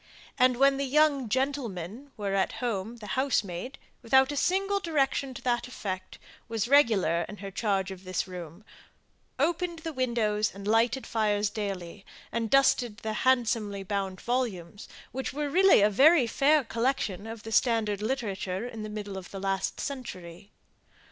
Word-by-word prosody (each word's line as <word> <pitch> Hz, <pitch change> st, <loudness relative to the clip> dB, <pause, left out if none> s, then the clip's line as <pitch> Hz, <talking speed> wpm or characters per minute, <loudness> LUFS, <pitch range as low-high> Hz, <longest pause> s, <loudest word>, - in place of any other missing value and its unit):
And 255 Hz, -1 st, +4 dB
when 275 Hz, +1 st, +4 dB
the 280 Hz, -, -1 dB
"young 285 Hz, -3 st, +3 dB
gentlemen" 255 Hz, -, -2 dB
were 200 Hz, -2 st, -2 dB
at 195 Hz, -, +1 dB
home 230 Hz, -1 st, -3 dB
the 220 Hz, -, -10 dB
housemaid, 250 Hz, -4 st, -1 dB, 0.2 s
without 265 Hz, +4 st, +4 dB
a -, -, -4 dB
single 390 Hz, +6 st, +1 dB
direction 275 Hz, -6 st, 0 dB
to -, -, -9 dB
that 240 Hz, -1 st, 0 dB
effect, 185 Hz, -6 st, -6 dB, 0.3 s
was 225 Hz, -1 st, -2 dB
regular 220 Hz, -, +4 dB
in 210 Hz, -, -8 dB
her 200 Hz, -1 st, -7 dB
charge 195 Hz, -2 st, -1 dB
of 190 Hz, -1 st, -9 dB
this 185 Hz, 0 st, -2 dB
room; 175 Hz, 0 st, -9 dB, 0.7 s
opened 340 Hz, +4 st, 0 dB
the 325 Hz, -, -3 dB
windows 225 Hz, -6 st, 0 dB
and 200 Hz, 0 st, -8 dB
lighted 230 Hz, +4 st, +2 dB
fires 210 Hz, -2 st, 0 dB
daily, 195 Hz, -3 st, -5 dB, 0.3 s
and 230 Hz, -1 st, -2 dB
dusted 250 Hz, -4 st, +3 dB
the 220 Hz, -2 st, -4 dB
handsomely 225 Hz, -5 st, +1 dB
bound 195 Hz, -1 st, -3 dB
volumes, 210 Hz, -7 st, -3 dB, 0.2 s
which 265 Hz, +2 st, -4 dB
were 295 Hz, +1 st, -2 dB
really 380 Hz, -, +6 dB
a 210 Hz, -, +5 dB
very 285 Hz, -, +6 dB
fair 285 Hz, +5 st, +3 dB
collection 230 Hz, -4 st, -1 dB
of 225 Hz, -1 st, -8 dB
the 225 Hz, -, -7 dB
standard 220 Hz, -4 st, +2 dB
literature 210 Hz, -4 st, -2 dB
in 225 Hz, -3 st, -7 dB
the 215 Hz, -, -5 dB
middle 205 Hz, -2 st, -5 dB
of 180 Hz, -, -12 dB
the 195 Hz, -, -7 dB
last 195 Hz, 0 st, -2 dB
century. 200 Hz, -, -7 dB
225 Hz, 160 wpm, -28 LUFS, 200-265 Hz, 0.7 s, really